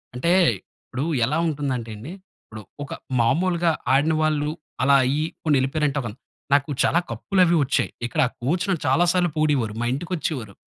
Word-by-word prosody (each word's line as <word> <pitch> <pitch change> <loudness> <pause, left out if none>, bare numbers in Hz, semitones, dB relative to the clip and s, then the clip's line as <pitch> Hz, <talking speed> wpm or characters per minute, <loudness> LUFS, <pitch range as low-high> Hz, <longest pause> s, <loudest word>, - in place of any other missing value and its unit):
అంటే 150 +8 0 0.3
ఇప్పుడు 130 +2 -8 0.2
ఎలా 145 +6 -1
ఉంటుందంటే 135 -7 -3
అండి. 125 +10 -8 0.3
ఇప్పుడు 110 -1 -10 0.2
ఒక 140 - -7 0.3
మామూలుగా 170 +7 +2 0.2
ఆడిన 145 +4 +3
వాళ్ళు, 150 -1 +1 0.3
అలా 140 +1 +5
అయ్యి, 145 +4 0 0.2
పోనీ 150 -3 +2
ఎళ్ళిపోయారంటే 145 +1 0
ఒక 120 - -5
అన్ 110 - -16 0.4
నాకు 140 +1 +3
చాలా 170 - +3
కప్పులు 185 - 0
అవి 175 0 +3
వచ్చాయి. 135 -2 0 0.2
ఇక్కడ 120 - 0 0.2
కోచ్ 160 +9 0
నన్ను 180 -5 0
చాలా 175 - +4
సార్లు 180 -1 +2
పొగిడేవారు. 145 -8 +1
మా - - 0
ఇంటికి 165 +7 -5
వచ్చేవారు. 125 -10 -4
145 Hz, 170 wpm, -23 LUFS, 130-165 Hz, 0.4 s, అలా